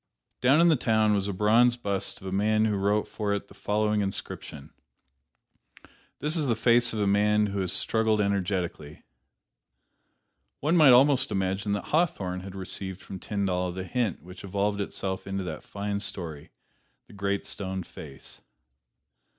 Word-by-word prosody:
Down 130 +5 +5
in 170 - +6
the 165 - +5
town 110 -4 +2
was 100 -1 0
a - - -1
bronze 115 +5 +4
bust 100 -3 -3
of - - -11
a 95 - -4
man 110 +3 +2
who 105 -2 +1
wrote 100 +2 +1
for 105 -2 -2
it 100 - -6
the - - -14
following 105 0 0
inscription: 80 -6 -5 1.5
"This 150 +3 -1
is 155 -4 +1
the 115 - +2
face 120 +1 +3
of 110 - -3
a 105 - +2
man 105 +1 +3
who 100 -1 -3
has 95 -2 0
struggled 110 -1 +1
energetically." 95 -6 -2 1.6
One 155 +5 +1
might 155 -6 +7
almost 135 +1 +5
imagine 95 +2 -1
that 100 - -4
Hawthorne 100 - +1
had 95 +1 -9
received 95 0 -5
from 95 -1 -9
Tyndall 90 -2 -1
the 95 +1 -5
hint 115 -1 -2
which 90 +1 -11
evolved 100 +1 -1
itself 95 -1 -4
into 95 0 -3
that 80 -4 -5
fine 100 0 -4
story, 85 -7 -4 0.6
"The - - -17
Great 100 0 -2
Stone 95 -1 -4
Face." 70 -4 -11
100 Hz, 160 wpm, -27 LUFS, 95-110 Hz, 1.6 s, might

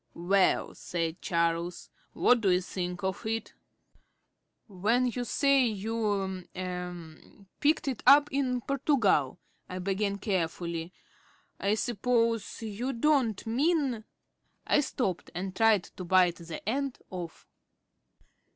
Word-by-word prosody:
"Well," 185 +3 +2
said 165 -1 -3
Charles, 170 0 -1 0.2
"what 245 -2 +4
do 200 - +2
you 180 0 +3
think 180 +1 -5
of 190 -1 -2
it?" 225 0 -3 1.1
"When 220 +5 +1
you 245 0 -2
say 275 +2 +3
you 205 -3 -2
er 180 0 -7
picked 300 +1 +2
it 260 -5 -2
up 290 +1 +8
in 260 -3 0
Portugal," 245 - +1 0.3
I 185 - -5
began 200 +2 -1
carefully, 170 -4 -2 0.7
"I 200 +2 +1
suppose 230 -1 0
you 225 +5 -3
don't 245 -5 +1
mean 265 -1 +1 0.3
" - - -54 0.3
I - - +3
stopped 245 - -2
and 185 +1 -4
tried 220 -4 +4
to 185 - -10
bite 180 -1 +3
the 170 +2 -8
end 270 +3 -1
off. 175 -3 -7
200 Hz, 120 wpm, -29 LUFS, 180-245 Hz, 1.1 s, up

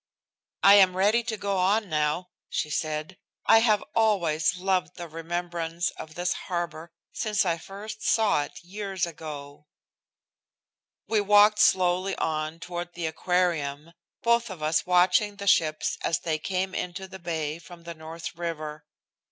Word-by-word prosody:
"I 200 - +9
am 185 -1 +4
ready 210 +5 +4
to 225 -2 -3
go 200 -1 -1
on 200 +4 +2
now," 155 +2 -1 0.2
she 150 - -2
said. 155 +2 -3 0.3
"I 225 - +7
have 215 -3 +3
always 180 -7 +2
loved 185 0 0
the 175 -1 -7
remembrance 170 +1 -3
of 160 0 -10
this 175 0 0 0.2
harbor 170 -2 -3 0.2
since 215 -2 0
I 170 -2 0
first 205 +4 -8
saw 220 -9 +3
it - - -13
years 190 0 -3
ago." 150 -3 -9 1.4
We 220 -2 +2
walked 210 +1 +5
slowly 185 -1 +3
on 155 +1 -2
toward 175 0 -6
the 175 -2 -3
Aquarium, 160 -2 -1 0.3
both 235 0 +3
of 180 -5 -7
us 155 +3 +1
watching 180 +3 +3
the 200 0 -7
ships 155 -5 +2
as 165 - 0
they 155 -2 -1
came 190 +2 -2
into 180 +2 -4
the 190 0 -10
bay 160 -3 -3
from 170 +1 -13
the 170 0 -7
North 160 +1 -8
river. 155 -3 -5
175 Hz, 150 wpm, -27 LUFS, 160-195 Hz, 1.4 s, I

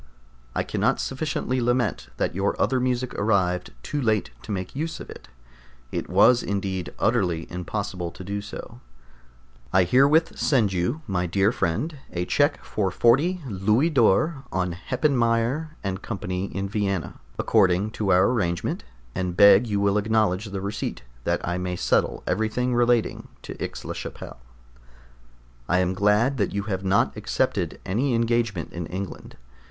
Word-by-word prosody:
I - - +1
cannot - - 0
sufficiently 135 -2 -2
lament 120 - 0
that - - 0
your 95 +3 -1
other 130 - +2
music 125 0 -1
arrived 95 -4 +1
too 145 - -2
late 110 -4 +1
to 70 - -8
make 95 +1 -4
use 160 +3 -3
of - - -9
it. - - -12 0.6
It - - -3
was 105 +7 +5
indeed 95 -3 -3
utterly 90 -8 +1
impossible 90 0 -4
to 95 - -9
do 100 +2 -3
so. 100 -10 -9 0.9
I 95 0 +5
herewith 140 - +3
send 115 -9 +2
you, 105 - -1
my 90 -5 -1
dear 95 +4 +2
friend, 140 - -2
a 90 0 -2
check 145 - +1
for 100 -3 -1
40 145 - +3
Louis 110 - +2
d'or 135 - +3
on 90 -2 -1
Heppenmayer 125 - 0
& 95 0 -2
Co. 105 -5 -5
in 95 +2 -3
Vienna, 100 -5 -2 0.2
according 100 -1 +3
to 105 -3 -1
our 95 +5 +5
agreement, 90 -8 -1 0.3
and 90 -1 -3
beg 100 +3 +7
you 105 -2 0
will 100 +1 +2
acknowledge 105 -2 +1
the 100 -2 -5
receipt, 100 - -4 0.2
that - - 0
I 90 +1 -1
may 90 0 -2
settle - - +1
everything 110 +5 0
relating 120 -1 +1 0.2
to - - -6
Aix - - -6
la - - -3
Chapelle. - - -8 1.3
I 90 - +3
am 90 0 +1
glad 105 +7 +2
that 100 -2 -1
you 100 - -1
have 95 -3 -3
not 95 +1 +2
accepted - - -1
any 120 +7 +1
engagement 115 -5 0
in 85 -1 -4
England. 95 +2 -6
100 Hz, 155 wpm, -25 LUFS, 95-120 Hz, 1.3 s, beg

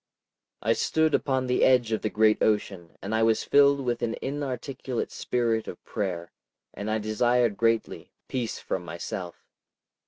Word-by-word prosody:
I 115 +2 +3
stood 160 +5 +1
upon 130 -2 +1
the 125 0 +1
edge 125 -3 +4
of 110 - 0
the 110 - -1
great 110 0 +3
ocean, 95 -5 0
and 100 +3 -3
I 110 - +2
was 115 0 +3
filled 140 0 +5
with 120 -2 -2
an 115 -1 -1
inarticulate 135 -2 -4
spirit 115 -2 -1
of - - -8
prayer, 90 -6 -3 0.4
and 105 +1 -5
I 110 - +1
desired 115 +1 +1
greatly—peace 115 +1 -2
from 90 - -4
myself. 85 +1 -6
115 Hz, 150 wpm, -27 LUFS, 105-125 Hz, 0.4 s, filled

